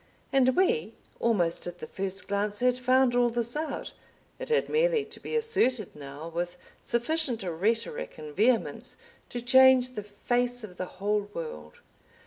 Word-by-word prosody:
And 260 -1 +4
we, 220 - +1 0.2
almost 175 -9 +1
at 175 0 -6
the 165 - -7
first 190 +3 -3
glance, 205 +1 -1
had 250 0 +3
found 255 0 +3
all 245 0 +3
this 235 +1 -2
out, 310 +1 -4 0.5
it - - -6
had 465 - +2
merely 470 -1 +2
to 440 - -9
be - - -5
asserted 260 - +1
now 145 +2 -8
with 175 +1 -4 0.2
sufficient 240 -1 -1
rhetoric 225 - -1
and 150 -1 -9
vehemence 230 +4 +1 0.3
to 245 - -4
change 260 +1 +6
the 215 - -5
face 245 +4 -1
of 180 -4 -10
the 185 - -3
whole 205 +1 0
world. 75 - -7
235 Hz, 155 wpm, -28 LUFS, 185-260 Hz, 0.5 s, change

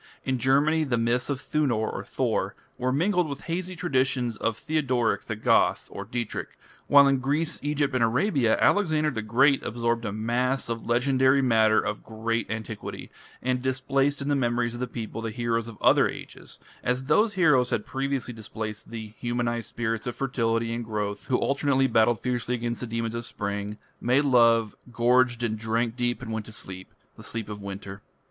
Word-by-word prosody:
In 130 -1 0
Germany 145 +5 +3
the 130 -5 0
myths 120 +3 0
of 140 -2 -1
Thunor 130 -8 -1
(Thor) - - -1 0.2
were 130 +1 0
mingled 180 +3 +1
with 140 -1 -6
hazy 180 +2 -4
traditions 130 -7 0
of 115 +1 -1
Theodoric 130 -6 0
the 110 - -3
Goth 110 - +2 0.2
(Dietrich), 120 -2 -4 0.3
while 140 -1 +7
in 135 -1 +3
Greece, 150 +5 -1
Egypt, 145 -1 0
and 125 -2 +2
Arabia, 125 - +2
Alexander 155 -6 +3
the 110 -5 -3
Great 130 +6 +3
absorbed 115 0 -1
a 105 - -2
mass 120 +5 0
of 115 -1 -4
legendary 130 +2 +3
matter 110 -3 +4
of 105 - -3
great 115 +1 -3
antiquity, 110 0 -6 0.3
and 125 0 0
displaced 135 +2 0
in - - -5
the 145 - +2
memories 120 -2 0
of 120 - -6
the 125 - -2
people 115 -1 -6
the 115 - -3
heroes 115 0 -1
of 115 -2 -9
other - - +5
Ages, - - -9 0.3
as 125 +1 0
those 205 +10 +3
heroes 150 -9 +4
had 105 - -1
previously 135 -1 -2
displaced 110 -1 -6
the 110 -2 -7
humanized 120 -1 -2
spirits 115 0 -2
of 120 - -3
fertility 115 -3 0
and 120 +1 -3
growth 105 -2 -4
who 125 - +2
alternately 140 -1 +1
battled 115 -2 +3
fiercely 125 -1 -1
against 120 0 -3
the 125 - -3
demons 115 0 -2
of 115 0 -3
spring, 100 -1 -4 0.2
made 130 +4 +3
love, 115 -4 +4 0.2
gorged 120 +1 +3
and 110 -2 -1
drank 115 +1 -1
deep 120 0 -1
and 110 -2 -5
went 110 -1 -4
to - - -9
sleep 95 -3 -8 0.3
the - - -11
sleep 115 -2 -5
of 105 -1 -6
winter. 100 0 -7
120 Hz, 180 wpm, -26 LUFS, 115-135 Hz, 0.3 s, while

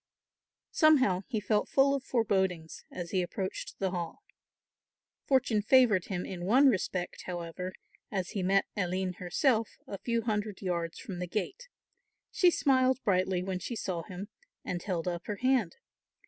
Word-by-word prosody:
Somehow 265 - +4
he 225 -5 -1
felt 210 0 0
full 275 0 +4
of 275 -2 -1
forebodings 190 -9 -1
as 175 -1 -6
he 185 - +2
approached 185 +2 -4
the 190 -2 -1
Hall. 175 - -5 1.0
Fortune 250 -5 +3
favoured 220 -5 +5
him 180 -2 -3
in 175 -2 -6
one 260 +9 +6
respect, 185 -4 -2
however, 175 +1 -4 0.4
as 190 -3 -2
he 200 - -2
met 195 +2 +3
Aline 185 -1 -1
herself 220 - +1 0.2
a 200 - -7
few 235 -1 -1
hundred 210 -2 -2
yards 170 -2 -2
from 180 -3 -7
the 180 - -3
gate. 215 - -4 0.6
She 360 - +5
smiled 260 -5 +3
brightly 185 -2 +1
when 185 -1 -3
she 235 - -5
saw 185 -5 -3
him, 185 +4 -8 0.4
and 175 -1 -3
held 180 -4 -3
up 175 -1 -3
her 210 - -2
hand. 255 -8 +1
195 Hz, 155 wpm, -30 LUFS, 180-235 Hz, 1.0 s, one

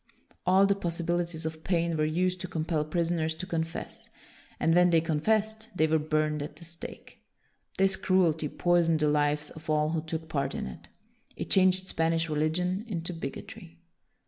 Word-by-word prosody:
All 190 +2 +6
the 200 - +4
possibilities 170 -2 -2
of 160 0 -5
pain 170 -2 +1
were 155 -1 +1
used 180 +3 0
to 185 - -4
compel 160 -2 -1
prisoners 160 0 -1
to 180 +3 -6
confess, 165 -2 -4 0.5
and 165 - +3
when 180 +1 +5
they 165 -1 +5
confessed 215 +8 0
they 155 - +4
were 160 0 +2
burned 155 0 0
at 145 - -6
the 170 - -10
stake. 165 0 -9 0.6
This 195 0 +3
cruelty 165 -5 +2
poisoned 170 -2 +2
the 150 - +3
lives 150 0 +1
of 160 0 -11
all 150 0 +2
who 160 -1 0
took 160 0 -5
part 140 -3 -2
in - - -3
it. 65 - -9 0.5
It - - -6
changed 185 0 +4
Spanish 165 -1 0
religion 175 +6 0
into 180 -4 -3
bigotry. 135 - -8
165 Hz, 170 wpm, -29 LUFS, 155-180 Hz, 0.6 s, All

